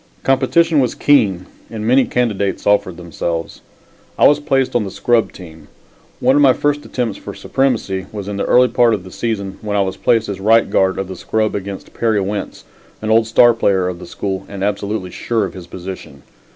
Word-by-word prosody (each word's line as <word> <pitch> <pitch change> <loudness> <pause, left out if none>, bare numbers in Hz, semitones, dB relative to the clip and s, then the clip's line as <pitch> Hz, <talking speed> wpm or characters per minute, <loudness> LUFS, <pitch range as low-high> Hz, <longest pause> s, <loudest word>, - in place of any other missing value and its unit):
Competition 160 +4 +2
was 125 -3 0
keen 100 -11 +2 0.2
and 110 -2 -6
many 130 +3 +4
candidates 105 -5 -1
offered 100 -4 +1
themselves. 85 -1 -5 0.6
I - - +6
was 145 0 +3
placed 135 -4 0
on 120 - +2
the 100 - -5
scrub 115 +4 +1
team. 80 -3 -13 0.5
One 130 +2 +3
of 145 - +4
my 135 -3 +6
first 145 +1 -1
attempts 120 -5 -3
for - - -8
supremacy 110 -8 -1
was 100 -2 -6
in 105 -1 -4
the - - -1
early 125 +1 +5
part 120 -2 +3
of 95 - -8
the 95 - -12
season 100 -4 -4
when 105 -1 -2
I - - +3
was 95 -1 -2
placed 115 -1 +1
as 100 -2 -5
right 110 +3 +4
guard 95 0 +1
of 95 - -3
the 95 - -7
scrub 110 +4 -1
against 100 -1 -6
Perry 110 -3 +1
Wentz, 100 +1 -4 0.4
an 110 0 -2
old 110 0 +4
star 120 +1 +5
player 95 -5 +1
of 90 -1 -5
the - - -10
school 95 -1 -4
and 100 -1 -6
absolutely 100 -2 -2
sure 115 +1 -1
of - - -7
his 90 -2 -10
position. 95 +2 -9
105 Hz, 205 wpm, -17 LUFS, 95-120 Hz, 0.6 s, I